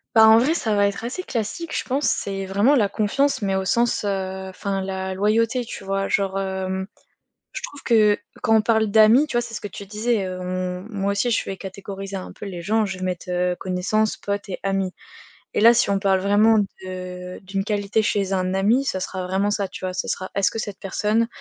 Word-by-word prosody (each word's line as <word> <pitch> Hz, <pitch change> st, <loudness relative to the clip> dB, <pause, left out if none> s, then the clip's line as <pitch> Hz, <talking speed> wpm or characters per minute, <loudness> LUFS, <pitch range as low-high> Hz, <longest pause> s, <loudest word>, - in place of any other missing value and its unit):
Bah, 220 Hz, 0 st, +8 dB
en 220 Hz, +1 st, +8 dB
vrai, 275 Hz, +8 st, +3 dB
ça 220 Hz, -10 st, 0 dB
va 200 Hz, 0 st, +4 dB
être 200 Hz, +3 st, -4 dB
assez 270 Hz, +10 st, -4 dB
classique, 245 Hz, -, -4 dB
je -, -, -1 dB
pense, 275 Hz, +3 st, 0 dB
c'est 195 Hz, -1 st, -1 dB
vraiment 205 Hz, +9 st, +3 dB
la 215 Hz, -7 st, +3 dB
confiance, 275 Hz, +9 st, 0 dB
mais 195 Hz, -1 st, 0 dB
au 190 Hz, 0 st, -1 dB
sens, 235 Hz, +2 st, +1 dB
heu, 190 Hz, -1 st, -3 dB
enfin 195 Hz, +1 st, -3 dB
la 190 Hz, 0 st, -3 dB
loyauté 230 Hz, +5 st, +1 dB
tu -, -, -8 dB
vois? 195 Hz, 0 st, -1 dB
Genre, 195 Hz, -1 st, 0 dB
hem, 190 Hz, 0 st, -2 dB, 0.7 s
je -, -, -6 dB
trouve 285 Hz, -, -8 dB
que 215 Hz, -3 st, +4 dB, 0.2 s
quand 225 Hz, -2 st, +3 dB
on 220 Hz, -, +5 dB
parle 220 Hz, -1 st, +2 dB
d'amis, 220 Hz, +7 st, +6 dB
tu -, -, -5 dB
vois, 240 Hz, -, +3 dB
c'est 235 Hz, -1 st, -8 dB
ce -, -, -4 dB
que 205 Hz, -, -5 dB
tu 200 Hz, +1 st, -9 dB
disais, 215 Hz, +1 st, 0 dB
heu, 185 Hz, 0 st, -5 dB
on 180 Hz, 0 st, -3 dB
moi 200 Hz, -2 st, -1 dB
aussi 200 Hz, +5 st, 0 dB
je 230 Hz, -, +1 dB
vais 195 Hz, -, -5 dB
catégoriser 195 Hz, +1 st, -7 dB
un 185 Hz, -, -6 dB
peu -, -, -9 dB
les 180 Hz, -3 st, -6 dB
gens. 215 Hz, +4 st, +1 dB
Je 190 Hz, -2 st, -5 dB
vais -, -, -5 dB
mettre, 180 Hz, -1 st, -3 dB
heu, 180 Hz, 0 st, 0 dB
connaissances, 195 Hz, +4 st, 0 dB
potes 200 Hz, 0 st, -4 dB
et 190 Hz, -, -5 dB
amis 195 Hz, -1 st, -1 dB, 0.6 s
et -, -, +2 dB
là, 230 Hz, +2 st, +8 dB
si 235 Hz, -, +2 dB
on 200 Hz, -1 st, +2 dB
parle 195 Hz, -1 st, +2 dB
vraiment 210 Hz, +3 st, +4 dB, 0.3 s
de 180 Hz, -1 st, -7 dB
d'une 195 Hz, 0 st, -3 dB
qualité 210 Hz, +1 st, 0 dB
chez 200 Hz, -3 st, 0 dB
un 185 Hz, 0 st, 0 dB
ami, 215 Hz, +8 st, +2 dB
ça 190 Hz, -8 st, -1 dB
sera 185 Hz, 0 st, -4 dB
vraiment 190 Hz, +3 st, +1 dB
ça 205 Hz, -1 st, 0 dB
tu 185 Hz, -, -6 dB
vois. 185 Hz, -, -4 dB
Ce 185 Hz, -, -3 dB
sera 185 Hz, -, -3 dB
est-ce 200 Hz, -1 st, +2 dB
que 225 Hz, -, -6 dB
cette 205 Hz, -3 st, -5 dB
personne, 210 Hz, +4 st, 0 dB
200 Hz, 230 wpm, -23 LUFS, 190-220 Hz, 0.7 s, Bah